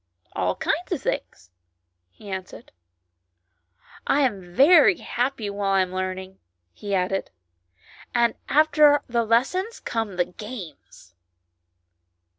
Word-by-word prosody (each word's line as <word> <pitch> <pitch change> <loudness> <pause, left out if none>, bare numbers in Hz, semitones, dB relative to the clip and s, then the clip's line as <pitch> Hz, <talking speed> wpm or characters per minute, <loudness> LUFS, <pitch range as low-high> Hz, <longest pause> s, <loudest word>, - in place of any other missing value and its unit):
" 85 - -34
All - - -1
kinds - - -2
of - - -2
things," 90 - -4 0.6
he 205 - -16
answered. 190 -1 -8 0.7
" 85 0 -26
I - - +3
am 195 -9 -2
very 330 +5 +6
happy 245 -3 -2
while 200 -1 -1
I 195 - +4
am 185 0 -2
learning," 185 0 -5 0.3
he 200 -1 -3
added. 190 +1 -1 0.8
"And 235 -2 +2 0.2
after 300 -1 +4
the 235 -1 0
lessons 270 - 0
come 225 -4 -3
the 175 -1 +1
games." 180 - -11
200 Hz, 120 wpm, -24 LUFS, 185-255 Hz, 0.8 s, very